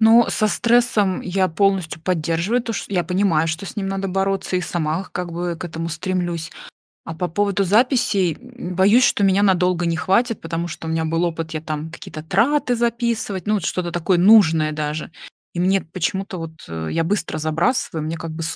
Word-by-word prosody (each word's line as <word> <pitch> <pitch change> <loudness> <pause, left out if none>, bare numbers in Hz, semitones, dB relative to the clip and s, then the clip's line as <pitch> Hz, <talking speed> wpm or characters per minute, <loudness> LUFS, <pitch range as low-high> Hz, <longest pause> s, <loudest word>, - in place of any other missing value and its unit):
Ну, 225 +1 +6
со 215 - +1
стрессом 230 -5 +2
я 185 0 0
полностью 185 -3 0
поддерживаю, 175 +7 0
то 230 - -4
ш - - -3
я 180 -3 0
понимаю, 180 -4 +1
что 165 +4 -3
с 235 - -8
ним 195 -2 -2
надо 195 0 -2
бороться 195 0 -1
и - - 0
сама, 170 +1 -2
как 180 -1 -4
бы, 175 0 -3
к - - -6
этому 165 -1 -4
стремлюсь. 170 0 -3 0.5
А 165 - -6
по 175 +2 -2
поводу 200 +2 0
записей, 205 - +2
м, 245 -7 -9
боюсь, 205 +7 +5
что 200 - +2
меня 195 +1 +3
надолго 180 -2 +2
не 165 -1 0
хватит, 220 +7 +1
потому 165 +1 -3
что 160 - -7
у - - -2
меня 160 0 0
был 165 +2 0
опыт, 165 -1 -3
я 155 - -3
там 155 0 -5
какие-то 155 -1 -9
траты 245 - +2
записывать, 235 -5 -1
ну, 215 - +2
вот, 200 - -1
что-то 175 -2 -2
такое 175 +1 +1
нужное 165 -6 +5
даже. 150 +1 -4 0.4
И - - -5
мне 190 +2 +3
эт 160 - -13
почему-то 190 +2 -2
вот, 165 -1 -6 0.2
э, 80 -1 -5
я 165 - +1
быстро 170 -3 -1
забрасываю, 160 +1 0
мне, 165 +1 -3
как 165 0 -6
бы, 165 +1 -6
180 Hz, 200 wpm, -21 LUFS, 165-200 Hz, 0.5 s, Ну